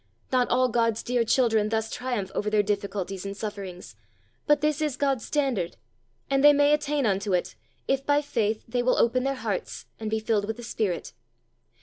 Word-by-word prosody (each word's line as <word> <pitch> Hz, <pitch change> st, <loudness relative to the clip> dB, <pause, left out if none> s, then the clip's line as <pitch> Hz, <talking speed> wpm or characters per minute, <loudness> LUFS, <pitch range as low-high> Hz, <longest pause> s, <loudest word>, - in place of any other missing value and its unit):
Not 255 Hz, -1 st, +2 dB
all 255 Hz, +1 st, +3 dB
God's 230 Hz, -2 st, +1 dB
dear 245 Hz, -1 st, +1 dB
children 225 Hz, -3 st, +2 dB
thus 220 Hz, 0 st, -1 dB
triumph 240 Hz, -7 st, -3 dB
over 210 Hz, -, -1 dB
their 210 Hz, -1 st, +3 dB
difficulties 200 Hz, -2 st, -3 dB
and 200 Hz, 0 st, -6 dB
sufferings, 195 Hz, -, -7 dB, 0.5 s
but 295 Hz, -1 st, +4 dB
this 300 Hz, 0 st, +1 dB
is 295 Hz, -4 st, -1 dB
God's 270 Hz, -5 st, 0 dB
standard, 260 Hz, -, -1 dB, 0.5 s
and 275 Hz, 0 st, +1 dB
they 295 Hz, 0 st, +9 dB
may 290 Hz, +1 st, +4 dB
attain 295 Hz, -2 st, 0 dB
unto 200 Hz, -1 st, 0 dB
it, 180 Hz, -, -2 dB, 0.3 s
if, 270 Hz, 0 st, +1 dB
by 290 Hz, +1 st, +3 dB
faith, 220 Hz, -6 st, -1 dB
they 245 Hz, +1 st, 0 dB
will 255 Hz, +1 st, +2 dB
open 250 Hz, +2 st, +2 dB
their 275 Hz, 0 st, 0 dB
hearts 220 Hz, -7 st, -4 dB
and 220 Hz, -1 st, -3 dB
"be 220 Hz, 0 st, 0 dB
filled 215 Hz, -2 st, 0 dB
with 220 Hz, +1 st, -4 dB
the 240 Hz, -, -9 dB
Spirit." 215 Hz, -6 st, -2 dB
230 Hz, 190 wpm, -26 LUFS, 205-270 Hz, 0.5 s, they